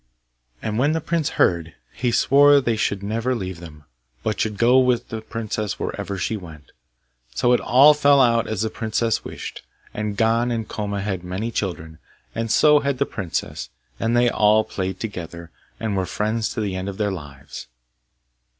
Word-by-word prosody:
And 110 +1 -2
when 145 +4 +3
the 160 - 0
prince 165 -1 -1
heard, 85 -3 +1 0.2
he 125 -2 -1
swore 145 +4 +5
they 120 -4 0
should 100 -2 -1
never 115 +5 -1
leave 95 -6 -5
them, 75 -4 -12 0.4
but 110 - -2
should 105 -2 -1
go 125 +4 +5
with 125 -2 +1
the 110 -1 -5
princess 110 -2 -4
wherever 100 - -4
she 105 +4 -2
went. 80 -7 -11 0.6
So 120 - +3
it 125 - +4
all 140 +5 +6
fell 145 -1 +4
out 115 -3 +3
as 110 -1 -2
the 110 - -2
princess 115 0 -1
wished; - - -7 0.3
and 105 -1 -3
Gon 115 +2 +2
and 115 -2 -2
Koma 100 -2 -3
had 95 -3 -3
many 95 +6 -4
children, 80 -7 -4 0.3
and 115 0 -3
so 150 +3 +5
had 140 -2 -1
the 140 - +1
princess, 95 -10 -4 0.3
and 115 +1 +1
they 120 0 +4
all 110 -1 +4
played 95 -3 -4
together, 85 -5 -7 0.3
and 110 -2 -2
were 95 -1 -1
friends 110 +4 -1
to 110 - -1
the 100 -3 -2
end 95 +1 -3
of 95 - -7
their 105 -2 0
lives. 75 -6 -9
110 Hz, 180 wpm, -22 LUFS, 95-120 Hz, 0.6 s, all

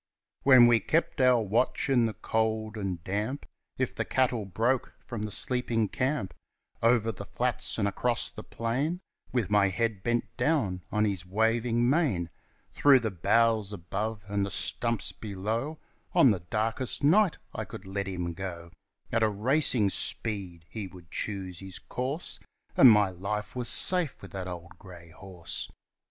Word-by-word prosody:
When 130 -3 +8
we 120 -1 +5
kept 155 - 0
our 125 -1 +5
watch 110 +4 0
in 125 -4 +3
the 110 - -5
cold 110 -1 -1
and 95 -5 -4
damp, 105 +9 -3 0.3
If - - -1
the - - -2
cattle 125 -5 0
broke 115 +7 0
from 115 -3 -5
the 105 - -5
sleeping 120 -4 0
camp, 130 -8 -1 0.5
Over 115 -1 +3
the - - -8
flats - - -1
and 100 - +1
across 115 +4 -1
the - - -9
plain, 135 +10 -2 0.3
With 115 -6 -1
my 100 -1 +4
head 110 0 -1
bent 120 +3 -1
down 105 - +1
on 105 +1 +2
his 95 -4 -1
waving 115 +5 +1
mane, 125 - +1 0.4
Through 140 -3 +5
the 110 -2 -1
boughs 110 +3 +2
above 105 +3 -4
and 100 0 0
the 100 - -2
stumps 115 +2 0
below 110 +9 -3 0.4
On 130 - +7
the 100 - 0
darkest 110 +10 -2
night 185 +5 +4 0.2
I - - -3
could 95 - -10
let 100 0 -3
him 90 -3 -3
go 85 -2 -6 0.4
At 115 - +1
a 110 - +4
racing 110 -1 +2
speed; 95 -8 -3
he 105 -3 -6
would 90 -3 -15
choose 95 -4 -4
his 95 -1 -6
course, 135 +6 -2 0.4
And 130 - +9
my 105 -3 +5
life 105 +5 -4
was 125 -2 -2
safe 180 -6 +1
with 95 - -10
the 95 -1 -5
old 85 0 -9
grey 85 -3 -13
horse. 90 -1 -6
110 Hz, 160 wpm, -29 LUFS, 95-120 Hz, 0.5 s, And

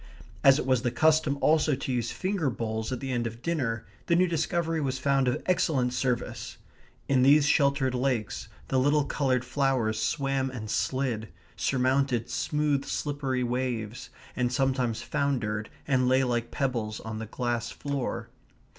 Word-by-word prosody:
As 135 0 +7
it 150 - -2
was 130 -2 +2
the 120 - +1
custom 155 +1 +3
also 155 -2 +3
to 130 0 -4
use 120 -1 -1
finger 185 -6 -1
bowls 110 -1 -3
at 125 - -3
the 135 -1 -3
end 120 -2 0
of 115 +2 -9
dinner, 125 -10 -1 0.2
the 170 - +4
new 180 +2 +5
discovery 165 0 0
was 130 -2 -1
found 135 0 +2
of 125 - 0
excellent 135 -8 +1
service. 125 -2 -2 0.5
In 135 -2 +3
these 140 +3 +6
sheltered 140 -3 +3
lakes 125 -4 -1 0.2
the 130 - +2
little 145 +3 +3
coloured 130 -3 0
flowers 130 -6 0
swam 135 -1 0
and 110 -5 -6
slid; 115 +1 -1 0.3
surmounted 130 -2 +1
smooth 150 -2 0
slippery 140 -4 -2
waves, 125 -1 -3 0.3
and 125 -1 0
sometimes 125 -3 0
foundered 120 -7 -1 0.2
and 130 -3 +2
lay 130 +1 +4
like 120 -2 -1
pebbles 120 -6 -2
on 110 -1 -5
the 110 - -5
glass 120 0 -2
floor. 140 -3 -4
130 Hz, 155 wpm, -28 LUFS, 120-140 Hz, 0.5 s, As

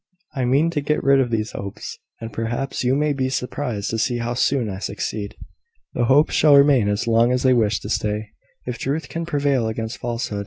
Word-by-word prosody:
I 130 -4 -1
mean 140 +7 +2
to 150 -3 -1
get 150 +2 -1
rid 135 0 +5
of 130 -2 +1
these 110 -1 -2
Hopes; 100 -1 -7 0.2
and, 115 -1 -7
perhaps, 120 +5 -3
you 125 +2 +2
may 150 +1 +1
be 130 -2 -1
surprised 125 -5 -3
to 115 - -2
see 120 +2 0
how 120 0 -2
soon 125 0 +1
I 95 -2 -5
succeed." 100 0 -4 0.6
"The 120 - 0
Hopes 140 +5 +4
shall 150 -2 +5
remain 140 -7 +5
as 105 0 -1
long 115 +1 +3
as 125 0 0
they 130 -1 +5
wish 110 -4 +2
to 105 - -7
stay, 105 -1 -2 0.4
if 125 -2 -5
truth 145 +6 -2
can 165 0 -4
prevail 140 -6 +1
against 110 +1 -4
falsehood. 115 -3 -3
120 Hz, 210 wpm, -22 LUFS, 110-140 Hz, 0.6 s, rid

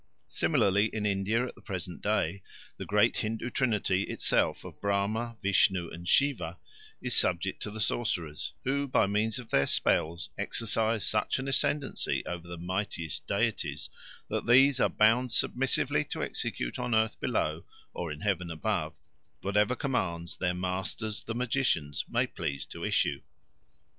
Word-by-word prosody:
Similarly 100 +2 +3
in 110 -1 -3
India 105 +4 +1
at - - -7
the - - -18
present 90 -5 -6
day 90 +5 0 0.4
the - - -6
great 105 +3 +3
Hindoo 115 +2 -2
trinity 105 -8 +1
itself - - +1
of - - -11
Brahma, 105 +4 0
Vishnu, 95 -3 +3
and 85 +1 -8
Siva 140 +6 +2 0.5
is 125 - +1
subject 90 +2 +1
to - - -2
the 110 +1 -7
sorcerers, 85 -9 -1
who, 140 +2 0
by 130 - +3
means 105 +3 +1
of 125 -3 -9
their 70 0 +3
spells, 80 -3 +1
exercise 110 -1 0
such 105 - +1
an 135 +1 -4
ascendency 135 +1 0
over 85 -1 -5
the 85 0 -6
mightiest 90 -3 -3
deities, - - -1 0.4
that - - -3
these 135 +2 +6
are - - +4
bound 115 +3 +3
submissively 130 +3 +2
to - - -4
execute - - -3
on 120 -2 0
earth 110 0 +1
below, - - -1 0.3
or 85 -3 -4
in 75 - -7
heaven 90 -4 0
above, 80 -2 -2 0.4
whatever 105 +5 +2
commands 90 - -2
their 90 -1 0
masters 95 +3 -2
the 115 - -4
magicians 120 - 0
may - - +2
please 70 0 -4
to - - -8
issue. - - +1
105 Hz, 150 wpm, -30 LUFS, 90-120 Hz, 0.5 s, these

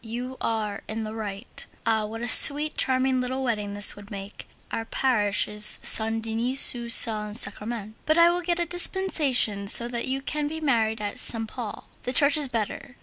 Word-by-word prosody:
You 245 +3 -8
are 215 -3 -4
in 220 +1 -6
the 215 0 -8
right. 210 0 -8 0.2
Ah! 220 -2 -1
what 225 +2 -9
a - - -4
sweet, 295 +5 +8
charming 260 0 -1
little 260 +1 -5
wedding 210 -5 -4
this 205 0 +3
will 205 0 -15
make! 200 0 -11 0.2
Our 225 - -5
parish 220 -4 -2
is 210 0 +1
Saint 225 0 +1
Denis 230 +4 +2
du 235 -1 -7
Saint 215 -2 +2
Sacrament, 220 -2 +1
but 310 +1 +1
I 340 0 +4
will 350 +1 -3
get 345 0 -3
a 345 - -3
dispensation 310 - +1
so 235 +4 +3
that 235 -1 -5
you 270 +1 -4
can 300 +1 -4
be 320 +2 -7
married 225 -7 -2
at 205 -1 -6
Saint 225 -1 -2
Paul. 230 -4 -9
The 250 - -6
church 285 +2 +4
is 300 -2 +1
better. 240 +1 -7
235 Hz, 195 wpm, -23 LUFS, 215-265 Hz, 0.2 s, sweet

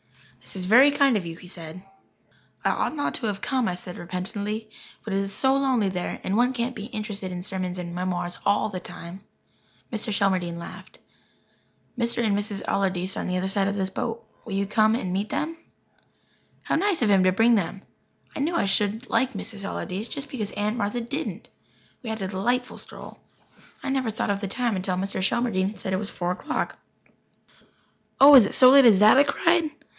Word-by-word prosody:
"This 130 +1 -8
is 185 - -4
very 250 +9 +7
kind 280 -3 +3
of 195 -4 -1
you," 165 - -6
he 180 - -13
said. 175 0 -9 0.8
"I - - +4
ought - - -1
not 290 - -1
to 230 - -2
have 200 -2 -2
come," 255 -3 0
I 180 - -1
said 180 0 -8
repentantly. 205 +5 -4 0.4
"But 215 - -3
it 195 - +1
is 195 0 -2
so 265 +6 +2
lonely 260 -6 +2
there 180 -2 -3
and 190 - -1
one 245 +3 +3
can't 250 0 -2
be 205 - -6
interested 210 -4 -5
in 180 0 -5
sermons 185 -1 -4
and 175 -1 -5
memoirs 180 0 -3
all 200 +1 +2
the 185 -3 -5
time." 175 +2 -9 0.7
Mr. 220 0 -2
Shelmardine 185 -4 0
laughed. 170 - -10 1.0
"Mr. 235 0 0
and 205 -2 +2
Mrs. 205 -1 -3
Allardyce 185 -1 0
are - - -3
on - - -3
the 180 0 -1
other 185 +1 -1
side 195 0 +1
of 200 - -1
the 195 -2 0
boat. 230 -1 -4 0.2
Will 215 - -7
you 200 +1 0
come 215 +2 +3
and 185 -6 -3
meet 200 +3 -2
them?" 325 +2 -2 1.1
How - - 0
nice 370 -4 +1
of 215 - +2
him 195 -2 +5
to 185 - +4
bring 225 +5 +4
them! 195 -2 -1 0.5
I - - -4
knew 320 +5 0
I 335 - +2
should 205 +3 0
like 260 0 +1
Mrs. 200 0 -7
Allardyce, 195 +2 -4
just 280 +4 -6
because 220 -7 -4
Aunt 210 +2 -1
Martha 210 +2 -1
didn't. 275 +7 -5 0.5
We 235 - -6
had 220 -2 -3
a - - -1
delightful 240 +7 -1
stroll. - - -11 0.6
I - - -3
never 265 -3 0
thought 215 -1 -1
of 200 0 -2
the 200 - -2
time 235 +1 -1
until 185 0 -1
Mr. 195 0 -3
Shelmardine 200 -1 0
said 190 -3 -3
it - - +2
was 205 +1 -3
four 175 0 -2
o'clock. 305 +12 -3 1.4
"Oh, 280 +2 +9
is 250 -7 +9
it - - -6
so 255 -1 +8
late 275 -1 +8
as 210 -5 +7
that?" 215 +5 +7
I - - +8
cried. 330 +3 +2
205 Hz, 205 wpm, -25 LUFS, 190-240 Hz, 1.4 s, Oh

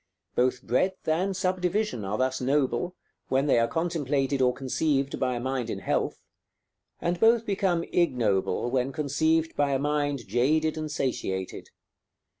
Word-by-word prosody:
Both 125 +1 +1
breadth 185 - 0
and 180 +4 +1
subdivision 185 - 0
are 100 +2 -2
thus 130 0 0
noble, 135 +5 0 0.3
when 135 +1 +1
they 135 -5 +4
are 115 - +3
contemplated 145 -4 0
or 125 -1 +4
conceived 135 +2 -1
by 125 -1 0
a - - -2
mind 130 -1 -2
in - - -3
health; - - -2 0.8
and 170 0 -1
both 230 +2 +4
become 190 -5 +1
ignoble, 120 - +1
when 130 +1 0
conceived 160 +3 +1
by 145 -1 +1
a - - +3
mind 145 -3 -1
jaded 150 +9 +2
and 155 -1 -4
satiated. 95 -8 -3
140 Hz, 145 wpm, -27 LUFS, 125-165 Hz, 0.8 s, they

